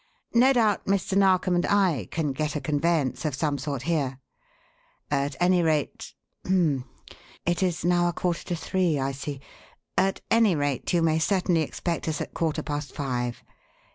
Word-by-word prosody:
No 250 +3 +6
doubt 225 -5 +2
Mr. 195 -1 0
Narkom 185 -2 +3
and 175 0 +2
I 185 - +2
can 155 -3 -1
get 150 +3 -2
a - - 0
conveyance 150 0 0
of 150 -4 -1
some 145 -1 -1
sort 140 -2 -4
here. 145 -6 -1 0.9
At 140 0 0
any 180 0 +4
rate 155 -3 -1 0.3
h'm! 160 -9 +1 0.6
it 175 +1 0
is 175 -3 0
now 175 0 +3
a - - -3
quarter 175 0 -2
to 175 - -2
three, 170 -1 0
I 135 0 -1
see 140 0 -6 0.5
at 195 0 +1
any 225 -5 +4
rate, 145 -3 -1
you 170 -2 +2
may 160 -1 +2
certainly 180 -1 +2
expect 170 +2 -3
us 155 -2 -1
at - - -5
quarter 160 -2 -1
past 145 -1 -4
five. 125 -4 -3
160 Hz, 170 wpm, -26 LUFS, 145-180 Hz, 0.9 s, No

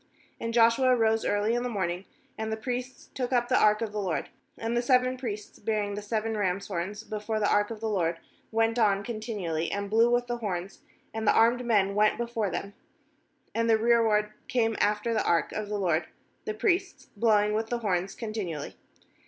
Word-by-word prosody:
^And 230 - -2
Joshua 235 +2 +4
rose 225 -1 +2
early 205 +2 +1
in 240 - +1
the 250 - -2
morn 195 -6 -1
ing, 180 +3 -6 0.3
and 220 0 -4
the 220 - -1
priests 250 +2 -5
took 250 -1 -3
up 240 -1 +1
the 255 - +4
ark 210 +2 +4
of 220 - -3
the 210 0 -3
LORD. 185 -5 -2 0.3
^And 225 +1 -2
the 240 - +2
seven 255 0 +3
priests 215 -5 -6
bearing 210 -1 -1
the 205 - -4
seven 220 +1 -2
rams' 200 -1 -1
horns 195 +3 -4
before 215 0 -3
the 205 - +2
ark 205 0 +2
of 225 -2 -7
the 225 - -1
LORD 170 -6 0 0.3
went 225 +1 +1
on 200 -3 +3
contin 220 -1 -5
ually, 165 -2 -1
and 200 0 -3
blew 230 +2 +5
with, 245 0 +2
the 240 0 -3
horns; 195 -4 -4 0.3
and 220 -1 -3
the - - +7
armed 235 +2 +4
men 205 -5 +2
went 210 +1 +3
before 235 -3 -1
them; 200 +2 -4 0.8
and 230 0 0
the 225 - +5
rearward 220 -2 +3
came 235 -5 +1
after 210 +3 +1
the 220 - +1
ark 170 -3 +1
of 210 -1 -4
the 210 - -1
LORD, 170 -4 +1 0.4
[the 215 - -3
priests] 360 - -1
blowing 210 -1 +3
with 220 +1 -1
the 240 - 0
horns 195 -4 -1
continually. 205 -10 -5
215 Hz, 205 wpm, -28 LUFS, 205-235 Hz, 0.8 s, the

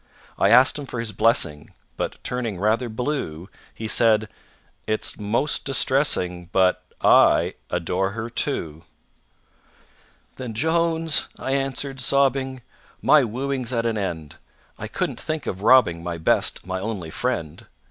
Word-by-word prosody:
I 100 - +4
asked 130 +6 +6
him 140 - -7
for 125 - -6
his 115 -2 -3
blessing, 105 -10 +1 0.2
But, - - -4
turning 115 -7 -3
rather 110 +4 +1
blue, 110 - -4 0.2
He 110 - -6
said: 110 -1 +3 0.6
"It's 110 +1 -2
most 115 +8 0
distressing, 125 - +1
But 90 -1 +2 0.2
I - - +5 0.2
adore 90 +3 -1
her, 110 +1 -4
too." 85 - -2 1.6
"Then, 125 -4 -6
JONES," 165 +2 +1
I 130 - -4
answered, 135 0 -2
sobbing, 130 -1 +1 0.4
"My 150 -2 +5
wooing's 130 +2 -3
at 115 -2 -1
an 115 -1 0
end, 80 -6 -5 0.4
I - - -5
couldn't - - -3
think 155 -1 -4
of 95 - -4
robbing 105 -8 +5
My 85 -1 -4
best, 80 - 0
my 95 0 -3
only 95 -5 -5
friend. 100 -12 -3
115 Hz, 135 wpm, -23 LUFS, 95-135 Hz, 1.6 s, asked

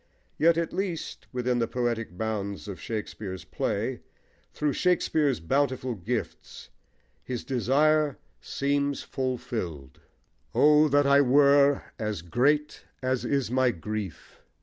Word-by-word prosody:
Yet 165 +2 +5
at 170 -1 -1
least 175 - -4
within 125 0 0
the 115 - +1
poetic 115 -6 -2
bounds 105 -2 -3
of 100 -3 -7
Shakespeare's 105 -4 -5
play, - - -2 0.5
through 150 -2 -1
Shakespeare's 160 - +1
bountiful 130 - 0
gifts, 95 -6 -5 0.5
his 125 -2 -4
desire 145 +4 +2 0.2
seems 140 0 -1
fulfilled. 115 - -4 0.6
O! 150 +1 +6
that 145 0 +3
I 140 0 +6
were 140 +1 +5 0.2
as 105 -6 -3
great 145 - +1 0.2
As 130 -1 0
is 135 -5 0
my 130 0 +3
grief. 105 -2 -6
130 Hz, 115 wpm, -27 LUFS, 110-145 Hz, 0.6 s, O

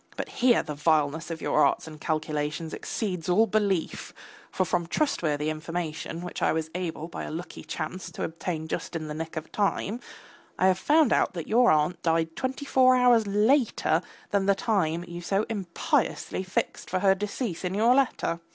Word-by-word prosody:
But - - -4
here 245 -2 +3
the 150 - -5
vileness 155 +1 +1
of 165 -1 -5
your 150 - +3
arts - - +2
and 155 -1 -11
calculations 155 0 -2
exceeds 180 -7 -3
all 215 +5 +5
belief, 200 -5 -1 0.3
for 185 - 0
from 175 -1 -1
trustworthy 155 - 0
information 165 0 -4
which 180 - -6
I - - +3
was 160 0 -2
able 165 -3 -4
by 170 - -6
a - - -5
lucky 170 +3 -7
chance 160 +3 -5
to - - -4
obtain 165 -1 -4
just 165 - -4
in 155 -1 -3
the 150 - -4
nick 160 +1 -5
of 155 - -6
time, 205 +2 0 0.6
I 185 - +2
have 185 0 +1
found 300 +3 +4
out - - +2
that 170 - -4
your 240 +2 +5
aunt 155 +3 +2
died 165 -1 +1
twenty 265 +2 -3
four 255 -2 +5
hours 245 -3 +4
later 220 +6 +2 0.3
than 200 -1 +1
the 200 - +5
time 175 -6 0
you 175 0 -7
so 195 +4 0
impiously 190 -2 -1
fixed 185 0 -3
for 185 0 -1
her 195 -1 +5
decease 200 -1 -4
in 180 +1 -2
your 230 +4 +5
letter. 255 -10 +1
175 Hz, 185 wpm, -27 LUFS, 160-210 Hz, 0.6 s, all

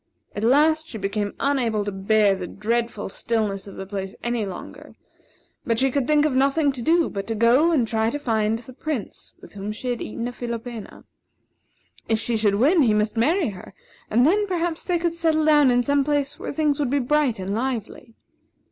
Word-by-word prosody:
At 205 - -3
last, 310 +6 +3
she 240 - -7
became 205 0 -3
unable 240 -7 0
to 205 - -2
bear 200 +1 +2
the 185 -2 -5
dreadful 230 +1 -2
stillness 205 -1 -2
of 200 - -10
the 190 - -6
place 195 -1 -5
any 235 -3 -1
longer; 180 -2 -9 0.7
but 230 -5 0
she 265 +2 +2
could 270 -1 -1
think 300 -1 +4
of 300 - +1
nothing 275 +3 +2
to 260 -3 -7
do 330 +6 +3
but 195 -1 -5
to 225 - -2
go 245 +9 +4
and 260 -8 +2
try 220 0 +1
to 290 - -3
find 225 -5 0
the 245 +2 -12
Prince 280 -4 -6
with - - -14
whom 205 +1 -5
she 250 +4 -5
had 240 -1 -2
eaten 230 +2 -4
a - - -4
philopena. 235 -2 -7 1.1
If 225 - +3
she 230 +1 -1
should 210 -2 +2
win, 300 - +4
he 225 -6 +3
must 210 +1 0
marry 305 - +2
her; 190 -1 -11 0.3
and 240 +4 +3
then, 410 +6 +3
perhaps, 345 -3 -2
they 355 -2 0
could 335 0 -1
settle 320 -2 +1
down 295 -3 +5
in 245 0 +3
some 285 +2 +2
place 290 0 -1
where - - -5
things 295 -1 0
would 285 -4 0
be 285 - +1
bright 280 -1 +1
and 190 +1 -4
lively. 230 0 -4
240 Hz, 205 wpm, -23 LUFS, 215-290 Hz, 1.1 s, down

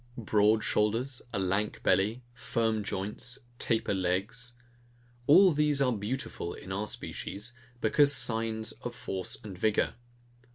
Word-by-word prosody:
Broad 105 -1 +3
shoulders, 115 +6 0
a - - -2
lank 95 +2 -1
belly, 105 +7 +2
firm 115 -3 -1
joints, 105 +6 -2 0.2
taper 110 -3 +1
legs; 95 +7 -1 0.7
all 185 +5 +8
these 150 -2 +2
are 135 -2 +3
beautiful 105 -4 -4
in 95 - -9
our 100 +3 -2
species, 105 +3 -6 0.3
because 140 +6 +5
signs 110 -4 +1
of - - -7
force 95 -1 -4
and 100 -3 -7
vigour. 105 +3 +1
110 Hz, 125 wpm, -30 LUFS, 100-125 Hz, 0.7 s, all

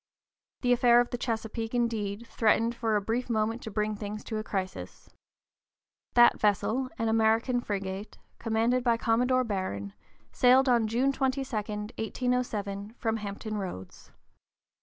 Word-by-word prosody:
The 245 -1 +3
affair 240 -1 +5
of 245 - +1
the 245 - -2
Chesapeake, 225 0 -3
indeed, 225 -2 -1
threatened 230 0 +2
for 225 -2 -1
a 205 - +2
brief 235 +5 -2
moment 225 +1 0
to 220 - -6
bring 210 0 -1
things 210 0 -6
to 220 - -4
a - - -4
crisis. 190 -3 -5 1.0
That 240 0 +6
vessel, 220 +5 +1
an 225 - -1
American 225 +3 +2
frigate, 195 -1 -5 0.2
commanded 230 +2 +1
by 235 -2 +3
Commodore 250 +3 +2
Barron, 185 - -3 0.4
sailed 260 +2 +5
on 235 -3 +3
June 245 +5 +2
22, 270 0 0
1807, 215 -1 -3
from 225 -1 -1
Hampton 210 +1 -5
Roads. 95 - -7
225 Hz, 140 wpm, -28 LUFS, 210-245 Hz, 1.0 s, That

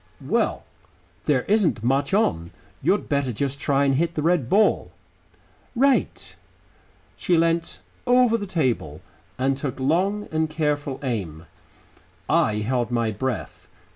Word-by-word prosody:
"Well, - - 0 0.6
there 135 -5 +2
isn't 195 - +1
much 135 +7 +1
on. 85 - +1 0.3
You'd 185 +8 +1
better 140 -3 0
just 140 +4 -3
try 140 0 +2
and 135 - +2
hit 170 +5 0
the 150 - -1
red 165 -7 +1
ball." 210 +2 +3 0.9
"Right." 270 +2 +1 0.8
She 175 - +1
leant 165 0 0 0.3
over 245 -2 +4
the 205 -3 -3
table 120 - -1 0.4
and 135 +1 +1
took 135 -1 -5
long 185 +10 0
and 160 0 0
careful 150 -3 -2
aim. 90 - -4 0.8
I 105 0 +2
held 120 +2 -1
my 115 -2 0
breath.... 125 +4 -4
140 Hz, 130 wpm, -23 LUFS, 125-170 Hz, 0.9 s, over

